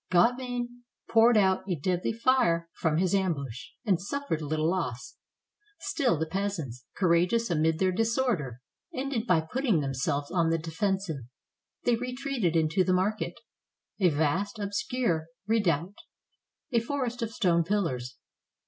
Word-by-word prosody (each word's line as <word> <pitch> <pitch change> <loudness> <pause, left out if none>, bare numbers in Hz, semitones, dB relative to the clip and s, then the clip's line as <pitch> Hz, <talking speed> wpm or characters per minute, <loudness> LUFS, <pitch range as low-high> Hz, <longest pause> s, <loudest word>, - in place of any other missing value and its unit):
Gauvain 245 +4 +1 0.3
poured 225 0 +6
out 190 -2 +4
a 180 - +1
deadly 180 +4 -1
fire 220 -9 +2
from 155 -1 0
his 180 +1 +2
ambush, 140 - -1 0.2
and 190 -6 +2
suffered 280 - -2
little 155 +1 0
loss. 130 -9 -3 0.6
Still 255 - +1
the 160 - 0
peasants, 160 -10 -3
courageous 180 +5 +2
amid 160 0 +2
their 185 +1 +2
disorder, 225 - 0 0.3
ended 260 -3 -2
by 180 -5 +4
putting 225 - 0
themselves 140 +1 -1
on 170 -3 +2
the 165 - +2
defensive; 175 +1 -1 0.7
they 245 - +3
re 250 +1 -4
treated 250 - -1
into 165 +3 +3
the 185 - +2
market, 200 +4 0 0.3
— - - -50
a 180 - +6
vast, 160 +9 0
obscure 200 -4 -1 0.2
redoubt, 195 -4 +1 0.7
a 235 - +4
forest 250 0 -3
of 230 - -1
stone 180 -7 +2
pillars. 160 - -1
185 Hz, 140 wpm, -28 LUFS, 160-230 Hz, 0.7 s, poured